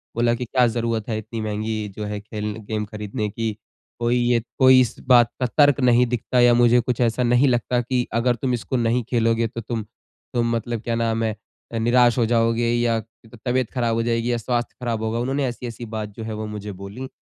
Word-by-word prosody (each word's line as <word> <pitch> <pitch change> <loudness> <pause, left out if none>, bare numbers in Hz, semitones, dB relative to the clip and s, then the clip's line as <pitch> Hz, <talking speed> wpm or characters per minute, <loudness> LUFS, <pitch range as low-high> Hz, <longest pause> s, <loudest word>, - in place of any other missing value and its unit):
बोला 120 0 +2
कि 125 - -4
क्या 125 +1 +3
ज़रूरत 115 -1 -2
है 110 - -1
इतनी 110 +1 -6
महँगी 110 0 -3
जो 105 - -3
है 105 0 -4
खेल 105 0 -5
गेम 105 0 -4
ख़रीदने 105 0 -4
की 110 +1 -3 0.5
कोई 120 +1 +1
ये 120 -1 +2 0.2
कोई 130 -1 +7
इस 125 - -1
बात 120 -2 +6
का 130 - +1
तर्क 145 -2 +5
नहीं 125 -1 +4
दिखता 125 +1 -1
या 120 0 +6
मुझे 120 0 +5
कुछ 125 0 -2
ऐसा 120 +1 +1
नहीं 125 +3 +4
लगता 125 0 +1
कि 125 0 -1
अगर 120 +1 +2
तुम 125 +2 -2
इसको 120 +2 -3
नहीं 120 +1 +1
खेलोगे 115 -1 +2
तो 115 +1 -7
तुम 115 0 -4 0.5
तुम 120 -1 +1
मतलब 115 -1 -3
क्या 115 - -1
नाम 115 -1 0
है 110 -2 -1 0.5
निराश 120 +1 +4
हो 120 - +3
जाओगे 115 0 +2
या 120 -1 +1 0.5
तबीयत 125 -1 0
ख़राब 120 -3 0
हो 115 - 0
जाएगी 115 +1 0
या 120 - +1
स्वास्थ्य 120 +1 -2
ख़राब 115 -2 -2
होगा 110 +1 -1
उन्होंने 135 +3 -1
ऐसी 125 0 -5
ऐसी 120 0 -7
बात 105 -1 -3
जो 115 - -5
है 110 0 -5
वो 110 0 -4
मुझे 105 -1 -6
बोली। 100 +7 -8
115 Hz, 215 wpm, -22 LUFS, 110-125 Hz, 0.5 s, कोई